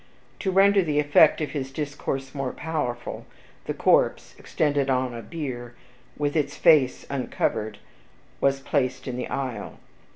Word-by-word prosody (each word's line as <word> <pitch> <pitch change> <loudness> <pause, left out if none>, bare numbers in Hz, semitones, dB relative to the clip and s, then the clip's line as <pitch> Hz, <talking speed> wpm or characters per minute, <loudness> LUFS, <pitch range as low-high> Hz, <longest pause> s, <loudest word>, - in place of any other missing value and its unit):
To 195 - -1
render 195 +1 +5
the 150 -4 -1
effect 150 +1 +5
of 150 - -2
his 135 -3 -3
discourse 135 -2 -4
more 135 -3 -3
powerful, 125 -7 -4 0.4
the - - -2
corse, - - +2
extended 145 -3 0
on 130 -1 +1
a 115 - -6
bier, 120 -6 -6 0.4
with 145 0 -1
its 145 -2 0
face 150 -7 +4
uncovered, 110 -5 -2 0.6
was 135 0 +2
placed 130 -2 -1
in 125 - -3
the 125 - -3
aisle. 125 -7 -4
140 Hz, 140 wpm, -25 LUFS, 130-150 Hz, 0.6 s, render